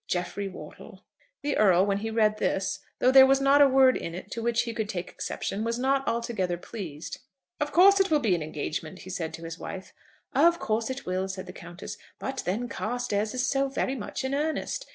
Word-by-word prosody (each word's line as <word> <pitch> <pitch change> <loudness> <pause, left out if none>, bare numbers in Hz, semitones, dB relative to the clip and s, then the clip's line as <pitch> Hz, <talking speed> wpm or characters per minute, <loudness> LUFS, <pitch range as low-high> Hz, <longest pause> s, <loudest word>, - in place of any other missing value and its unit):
"JEFFREY 185 +3 -2
WORTLE." 190 - -11 0.4
The 290 0 0
Earl, 190 -3 +5
when 200 -1 0
he 220 +2 -3
read 215 -1 +2
this, 190 -1 0 0.2
though 255 - +4
there 265 0 +9
was 270 0 +4
not 275 +1 +5
a 280 - +7
word 260 -1 +5
in 165 - -4
it 180 - -9
to 230 - -4
which 235 0 +1
he 230 -1 -4
could 220 -2 -3
take 185 -3 -4
exception, 205 +2 -4
was 230 +1 -1
not 270 +2 +1
altogether 230 -6 -1
pleased. 175 - -7 0.4
"Of 295 0 -1
course 395 +3 +7
it 390 - +3
will 310 - +4
be 225 -9 +2
an 170 - 0
engagement," 155 +3 -5
he 185 - -9
said 165 -4 -3
to 165 - -11
his 165 0 -7
wife. 190 - -7 0.4
"Of 340 0 +5
course 220 -4 -1
it 260 +1 -5
will," 185 +1 -1
said 190 0 -6
the 180 - -9
Countess. 175 +1 -9 0.2
"But 265 0 -4
then 220 +7 -1
Carstairs 220 -2 -2
is 250 0 0
so 275 +1 +1
very 270 0 -1
much 245 -1 -5
in 265 - -2
earnest. 315 - -2
225 Hz, 215 wpm, -27 LUFS, 185-270 Hz, 0.4 s, there